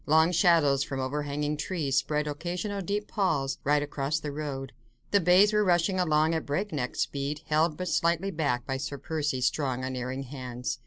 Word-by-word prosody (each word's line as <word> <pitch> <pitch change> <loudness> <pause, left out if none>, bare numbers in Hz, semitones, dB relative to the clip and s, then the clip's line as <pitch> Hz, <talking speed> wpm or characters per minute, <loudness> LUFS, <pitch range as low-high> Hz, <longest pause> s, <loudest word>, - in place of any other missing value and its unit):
Long 160 +3 +5
shadows 160 -5 +4
from 135 -1 -4
overhanging 145 +2 -2
trees 150 -4 -2
spread 150 0 +1
occasional 180 +7 -3
deep 205 +3 -2
palls 145 -9 0
right 145 +1 +2
across 145 +1 -2
the 150 -1 -5
road. 140 -2 -5 0.4
The 200 - +5
bays 185 +4 +5
were 210 0 +4
rushing 180 0 +2
along 155 -2 +3
at 160 - -1
breakneck 145 -4 -2
speed, 145 +2 -2
held 155 0 +1
but 185 - -3
slightly 170 +4 +1
back 145 -8 -1
by 135 - -2
Sir 140 +1 -4
Percy's 145 -5 -1
strong, 130 -4 0
unerring 130 +1 -3
hands. 125 -2 -5
150 Hz, 170 wpm, -28 LUFS, 140-170 Hz, 0.4 s, Long